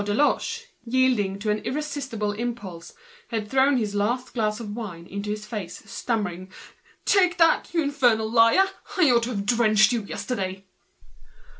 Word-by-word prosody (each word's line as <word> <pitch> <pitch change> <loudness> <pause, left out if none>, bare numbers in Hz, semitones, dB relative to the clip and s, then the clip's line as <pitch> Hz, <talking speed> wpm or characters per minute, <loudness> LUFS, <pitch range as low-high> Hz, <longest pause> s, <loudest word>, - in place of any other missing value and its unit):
Deloche, 295 - 0 0.2
yielding 240 -6 +1
to 210 +1 -1
an 210 - 0
irresistible 265 -6 -3
movement, 210 -7 -5 0.4
had 225 -2 -2
just 210 - -15
thrown 265 +1 +4
his 215 -4 -1
last 235 +5 -1
glass 215 -2 -1
of 215 -3 -6
wine 190 -8 -7
into 200 +3 -5
his 210 0 -3
tormentor's 210 -6 -5
face, - - -15
stammering: 185 -6 -3 0.5
"Take 365 -3 +3
that, 330 -1 +3
you 330 -2 +1
infernal 245 -6 +2
liar! 230 +11 +5 0.3
I 325 -8 +5
ought 235 -1 +4
to - - -4
have 200 -5 -3
drenched 215 -1 +4
you 235 -2 0
yesterday!" 195 -3 -4
230 Hz, 160 wpm, -25 LUFS, 205-260 Hz, 0.5 s, liar